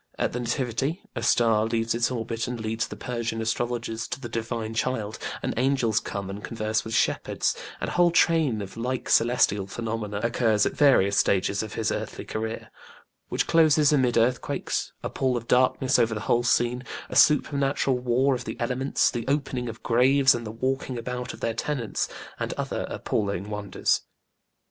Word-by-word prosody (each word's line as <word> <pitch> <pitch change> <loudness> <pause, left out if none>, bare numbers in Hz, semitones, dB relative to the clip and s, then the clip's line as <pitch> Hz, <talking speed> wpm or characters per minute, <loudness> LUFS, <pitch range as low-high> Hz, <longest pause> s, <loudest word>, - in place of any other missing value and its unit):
At - - -1
the 125 - -2
nativity 130 - -2
a - - -3
star 115 -2 +3
leaves 115 0 0
its 115 0 +1
orbit 115 -2 -3
and 125 -1 -4
leads 110 +1 -2
the - - -8
Persian 115 -2 -3
astrologers 115 0 -2
to 125 - -5
the 120 -3 -7
divine 115 -1 -3
child, 110 -2 -2 0.2
and - - -1
angels 125 -4 +2
come 100 -3 -5
and 100 +2 -7
converse 110 -1 -1
with 110 - -4
shepherds, - - +1 0.2
and - - -3
a - - -3
whole 175 0 +4
train 160 -10 +2
of 95 -1 -10
like 125 +2 -3
celestial 115 -4 +3
phenomena 110 -1 -4
occurs 115 -3 +2
at - - -1
various 100 -9 +4
stages 100 0 +2
of 110 -1 -6
his 110 -1 0
earthly - - -4
career, 110 +1 -5 0.6
which - - 0
closes 155 -2 +4
amid 130 -5 +2
earthquakes, 120 +2 0
a - - -2
pall 130 -2 0
of 115 0 -7
darkness 130 +1 +3
over 115 -2 +2
the 105 - -4
whole 120 +2 +2
scene, 120 0 +1 0.3
a - - -7
supernatural 140 -2 +3
war 125 +3 +2
of 125 -1 -3
the - - -6
elements, 125 +3 +1
the 120 -1 -4
opening 135 -3 -1
of 115 - -9
graves 135 +3 +4
and 115 -2 -4
the - - -5
walking 130 +2 -2
about 125 +1 -4
of - - -12
their 115 - 0
tenants, 120 -1 -2 0.3
and - - -2
other - - -3
appalling 100 0 -2
wonders. 105 -1 0
120 Hz, 175 wpm, -26 LUFS, 110-130 Hz, 0.6 s, whole